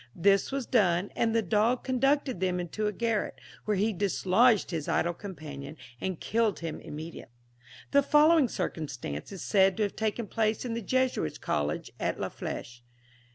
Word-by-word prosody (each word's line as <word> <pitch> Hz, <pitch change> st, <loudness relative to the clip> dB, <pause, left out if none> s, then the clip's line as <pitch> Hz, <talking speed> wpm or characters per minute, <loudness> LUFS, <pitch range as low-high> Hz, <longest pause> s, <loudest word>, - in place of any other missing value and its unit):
This 195 Hz, +5 st, +3 dB
was 270 Hz, -2 st, -2 dB
done, 185 Hz, -6 st, +2 dB
and 230 Hz, -1 st, +1 dB
the 225 Hz, -, +3 dB
dog 215 Hz, +6 st, +2 dB
conducted 270 Hz, -3 st, +1 dB
them 180 Hz, -1 st, 0 dB
into 180 Hz, +5 st, -2 dB
a -, -, 0 dB
garret, 225 Hz, +1 st, -1 dB, 0.3 s
where 210 Hz, -2 st, +1 dB
he 215 Hz, +3 st, +1 dB
dislodged 200 Hz, +3 st, +3 dB
his 160 Hz, -4 st, -3 dB
idle 170 Hz, +1 st, +1 dB
companion, 155 Hz, -6 st, -8 dB, 0.2 s
and 185 Hz, -3 st, -3 dB
killed 220 Hz, -3 st, 0 dB
him 165 Hz, -1 st, -4 dB
immediately. 155 Hz, -5 st, -8 dB, 0.6 s
The 280 Hz, -, +6 dB
following 300 Hz, +1 st, +5 dB
circumstance 135 Hz, -, -4 dB
is 195 Hz, -, -7 dB
said 190 Hz, -2 st, +3 dB
to 220 Hz, -, +2 dB
have 200 Hz, -, -2 dB
taken 220 Hz, +1 st, -1 dB
place 220 Hz, +2 st, 0 dB
in 240 Hz, -, -2 dB
the 230 Hz, -, -3 dB
Jesuits' 255 Hz, -, 0 dB
College 75 Hz, +1 st, -2 dB
at -, -, -1 dB
La -, -, -2 dB
Flèche. 120 Hz, 0 st, -6 dB
205 Hz, 165 wpm, -29 LUFS, 170-230 Hz, 0.6 s, The